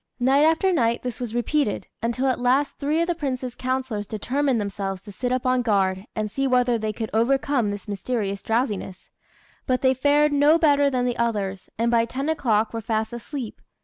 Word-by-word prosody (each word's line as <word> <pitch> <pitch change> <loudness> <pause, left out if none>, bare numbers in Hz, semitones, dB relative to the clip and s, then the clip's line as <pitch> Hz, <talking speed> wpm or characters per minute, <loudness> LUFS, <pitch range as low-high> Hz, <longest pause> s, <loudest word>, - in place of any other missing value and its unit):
Night 270 +4 +4
after 325 +4 +3
night 235 -7 +1
this 250 -2 -5
was 240 -2 -4
repeated, 240 -1 0 0.2
until 235 +3 -1
at 260 -2 +1
last 260 +4 +1
three 300 +3 +1
of - - +2
the 350 - +1
Prince's 260 -6 -3
councillors 255 -5 -3
determined 255 +4 0
themselves 195 -2 -4
to 210 - -10
sit 245 +5 -3
up 255 0 -1
on 255 0 +2
guard, 195 -3 0
and 215 -1 -2
see 275 +3 0
whether 250 -2 +2
they 215 0 -2
could 220 0 -5
overcome 250 0 +2
this 205 +1 -6
mysterious 200 -1 -3
drowsiness; 215 -5 -2 0.6
but 255 -1 +1
they 260 0 +5
fared 290 +3 +3
no 290 +3 +5
better 285 -3 +4
than 250 -2 0
the 245 -1 -1
others, 205 -5 -2
and 230 +1 +1
by 230 -1 +4
ten 270 +5 -3
o'clock 225 -9 +1
were 230 - -3
fast 220 +1 -2
asleep. 240 0 -6
245 Hz, 195 wpm, -24 LUFS, 215-275 Hz, 0.6 s, they